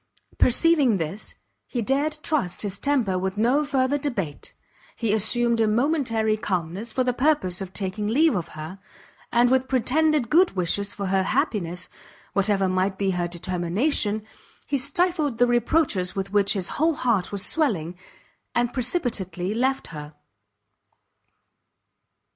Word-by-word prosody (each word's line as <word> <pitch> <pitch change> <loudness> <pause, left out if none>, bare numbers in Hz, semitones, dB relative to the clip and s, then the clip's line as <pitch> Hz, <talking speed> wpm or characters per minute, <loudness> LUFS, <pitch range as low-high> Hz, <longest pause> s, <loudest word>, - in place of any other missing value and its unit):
Perceiving 275 -3 +5
this, 170 +5 -5 0.3
he 240 -3 -3
dared 285 +6 0
trust 255 - -1
his 200 -1 -3
temper 240 -10 +1
with 190 +2 -3
no 250 +7 +2
further 280 -1 0
debate; 200 - -4 0.4
he 225 -3 0
assumed 230 +2 +2
a 220 - +3
momentary 230 -3 +1
calmness 195 0 -3
for 255 +3 0
the 250 0 0
purpose 250 - +1
of 190 -1 -6
taking 195 +2 -3
leave 300 +8 +3
of 170 -3 -2
her, 160 +5 -7 0.5
and 240 +1 +4
with 260 0 +2
pretended 270 +1 +1
good 350 - +4
wishes 195 +3 -1
for 200 - -5
her 190 0 +1
happiness, 180 -2 -1 0.5
whatever 200 -1 +2
might 185 +1 0
be 195 -1 0
her 175 -1 -1
determination, 185 - -1 0.4
he 285 - -2
stifled 295 0 +1
the 245 - +5
reproaches 240 - +1
with 195 0 -4
which 200 -1 +3
his 190 -4 -3
whole 320 0 +3
heart 235 -9 0
was 200 -1 0
swelling, 190 - 0 0.6
and 240 0 +1
precipitately 230 - -1
left 260 +4 -1
her. 150 -1 -9
220 Hz, 140 wpm, -24 LUFS, 190-265 Hz, 0.6 s, Perceiving